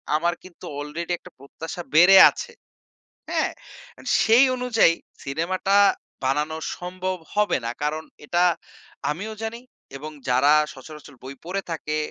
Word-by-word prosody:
আমার 170 Hz, +3 st, +1 dB
কিন্তু 185 Hz, -2 st, -13 dB
আলরেডি 155 Hz, +4 st, -5 dB
একটা -, -, -15 dB
প্রত্যাশা 160 Hz, +5 st, -8 dB
বেড়ে 180 Hz, +4 st, +8 dB
আছে। 475 Hz, -, -7 dB, 0.8 s
হ্যাঁ, -, -, 0 dB, 0.7 s
সেই 230 Hz, +4 st, +6 dB
অনুযায়ী 245 Hz, -8 st, +3 dB, 0.3 s
সিনেমাটা 175 Hz, +7 st, -1 dB, 0.5 s
বানানো 150 Hz, +4 st, 0 dB, 0.2 s
সম্ভব 185 Hz, +1 st, -4 dB, 0.2 s
হবে 210 Hz, 0 st, +2 dB
না। 115 Hz, -, -1 dB
কারণ 155 Hz, +1 st, -1 dB, 0.2 s
এটা 175 Hz, +4 st, +2 dB, 0.7 s
আমিও 205 Hz, +8 st, -5 dB
জানি 225 Hz, +1 st, -4 dB, 0.4 s
এবং 155 Hz, +3 st, -8 dB, 0.2 s
যারা 135 Hz, +4 st, +4 dB, 0.2 s
সচরাচর 145 Hz, +1 st, -12 dB
বই 135 Hz, +1 st, -8 dB
পড়ে 190 Hz, +3 st, -2 dB
থাকে 155 Hz, -1 st, -3 dB
165 Hz, 125 wpm, -24 LUFS, 150-185 Hz, 0.8 s, বেড়ে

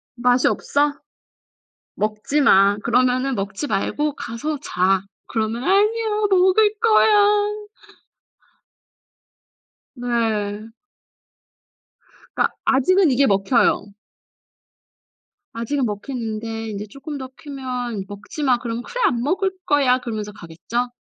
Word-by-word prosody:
"맛이 250 Hz, +1 st, +3 dB
없어? 290 Hz, 0 st, +1 dB, 1.0 s
먹지 215 Hz, +8 st, -1 dB
마. 200 Hz, -4 st, +5 dB
그러면은 255 Hz, +2 st, +2 dB
먹지 200 Hz, +8 st, -4 dB
말고 285 Hz, +8 st, -1 dB
가서 290 Hz, +6 st, -4 dB
자." 185 Hz, -4 st, +1 dB, 0.3 s
그러면 225 Hz, +2 st, -2 dB
"아니야 425 Hz, +3 st, +2 dB
먹을 395 Hz, +3 st, +4 dB
거야." 420 Hz, -1 st, +3 dB, 2.3 s
네. 220 Hz, -3 st, -2 dB, 1.7 s
그니까 -, -, +1 dB
아직은 300 Hz, +6 st, +3 dB
이게 270 Hz, +2 st, +3 dB
먹혀요. 200 Hz, +1 st, +2 dB, 1.6 s
아직은 240 Hz, +4 st, -1 dB
먹히는데 225 Hz, 0 st, -4 dB
인제 205 Hz, 0 st, -5 dB
쪼끔 280 Hz, +5 st, -7 dB
더 260 Hz, -1 st, -7 dB
크면 250 Hz, -7 st, -5 dB
"먹지마." 245 Hz, +6 st, -2 dB
그럼 235 Hz, -1 st, -4 dB
"그래 -, -, -5 dB
안 240 Hz, -2 st, -1 dB
먹을 380 Hz, -, 0 dB
거야." 270 Hz, -3 st, +3 dB
그러면서 215 Hz, -4 st, -5 dB
가겠죠. 195 Hz, +8 st, -4 dB
250 Hz, 210 characters per minute, -21 LUFS, 220-300 Hz, 2.3 s, 마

